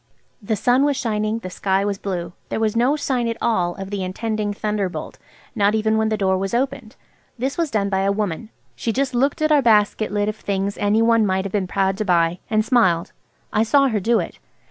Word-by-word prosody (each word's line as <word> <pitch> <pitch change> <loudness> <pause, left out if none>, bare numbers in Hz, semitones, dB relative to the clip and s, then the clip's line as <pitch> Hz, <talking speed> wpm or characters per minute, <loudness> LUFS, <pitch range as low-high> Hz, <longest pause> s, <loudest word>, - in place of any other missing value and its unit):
The 215 +1 -1
sun 245 +6 +3
was 285 -2 +1
shining, 215 -1 -1
the 185 -5 -7
sky 195 +1 0
was 200 -1 -2
blue. 175 -3 -4 0.2
There - - -2
was 220 -1 0
no 250 +5 +3
sign 260 -5 -1
at 230 0 -2
all 180 -7 0
of 195 0 -7
the 200 -2 -2
intending 215 +3 -2
thunderbolt, 205 -2 -3 0.3
not 205 -2 +2
even 220 0 +1
when 220 0 +1
the 215 - 0
door 190 -2 +1
was 195 +4 -2
opened. 255 -3 -2 0.4
This 265 +3 -2
was 335 -3 -1
done 210 -5 0
by 190 -1 0
a 195 +1 +2
woman. 205 0 -3 0.3
She 230 - -2
just 265 +2 -1
looked 275 +5 +1
at 310 - +2
our 295 -2 +5
basket 215 -2 +2
lid 205 0 0
of 215 0 -3
things 200 0 -2
any 210 +2 +2
one 230 -1 +4
might 190 -1 0
have 200 - -4
been 195 -2 -1
proud 195 0 0
to 215 - -1
buy, 170 -1 +2
and 215 -1 +1
smiled. 185 -10 +2 0.4
I 215 - +3
saw 275 +4 +4
her 220 -3 0
do 230 +4 +2
it. - - -6
215 Hz, 225 wpm, -21 LUFS, 195-235 Hz, 0.4 s, our